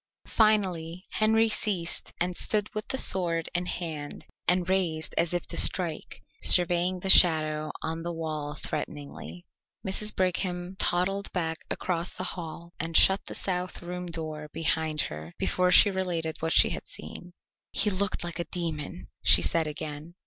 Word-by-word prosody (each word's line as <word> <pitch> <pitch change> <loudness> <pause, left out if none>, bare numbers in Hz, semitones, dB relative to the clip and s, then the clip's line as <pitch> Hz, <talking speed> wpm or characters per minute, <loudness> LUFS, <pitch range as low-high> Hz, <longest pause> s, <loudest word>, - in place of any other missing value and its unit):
Finally 185 -6 0
Henry 220 +1 +2
ceased 195 -6 -2
and 180 +1 -1
stood 210 +2 +1
with 215 +1 -5
the 265 - -2
sword 170 -7 +3
in 175 +1 -1
hand 155 -5 -6 0.2
and 180 0 +1
raised 175 -5 -1
as 170 - +1
if 175 0 -2
to - - -3
strike, 170 -4 +3 0.2
surveying 180 +1 +6
the 195 - -4
shadow 155 -4 +4
on 165 +1 -4
the 170 +1 -5
wall 155 -3 -5
threateningly. 150 +3 -7 0.4
Mrs. 210 +2 0
Brigham 180 0 -2
toddled 195 +3 0
back 165 -3 -2
across 175 -1 -2
the - - -5
hall 170 0 -9
and 165 +1 0
shut 190 +1 +4
the - - -3
south 180 -1 -3
room 180 +1 -6
door 155 -2 -5
behind 160 -1 -1
her 80 +2 -7
before 180 0 0
she 205 +2 +7
related 175 -4 -3
what 160 0 -2
she - - +5
had - - -6
seen. 175 - -10 0.4
"He 210 +1 +1
looked 190 -1 -2
like 175 0 -6
a 170 - -3
demon!" 150 - -5
she - - +5
said 165 -2 +1
again. 150 +2 -8
175 Hz, 155 wpm, -27 LUFS, 160-185 Hz, 0.4 s, she